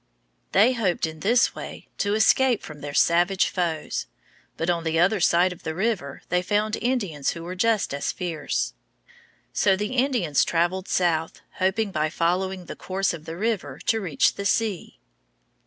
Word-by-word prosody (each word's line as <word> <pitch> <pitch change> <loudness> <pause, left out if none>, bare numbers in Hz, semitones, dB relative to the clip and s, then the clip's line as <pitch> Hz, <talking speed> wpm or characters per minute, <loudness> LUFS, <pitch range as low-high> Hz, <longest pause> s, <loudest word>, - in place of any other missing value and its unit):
They 225 +6 +5
hoped 195 -10 0
in 160 0 -7
this 235 +8 +3
way - - -8
to 205 0 +1
escape 245 +2 +3
from 150 -2 -10
their 145 - -5
savage 175 +3 +3
foes; 170 -4 -2 0.5
but 165 - -2
on 170 -1 +1
the 160 0 0
other 185 +5 +3
side 175 +1 +3
of 180 - -16
the 160 0 -4
river 185 -8 -2
they 180 0 +2
found 210 +3 0
Indians 200 - -1
who 165 - -8
were 175 +2 -5
just 215 -2 +1
as 140 - -1
fierce. 165 - -2 0.8
So 195 - +3
the 210 +6 -3
Spaniards 245 - +2
traveled 175 +3 0
south, 165 -3 0 0.2
hoping 195 +3 +1
by 155 -3 0
following 180 +3 -1
the - - -7
course 190 0 -1
of 160 -2 -9
the 165 +1 -6
river 195 -10 -2
to 225 -1 +2
reach 165 -8 +2
the 200 - -6
sea. 210 -4 -1
180 Hz, 170 wpm, -25 LUFS, 165-210 Hz, 0.8 s, They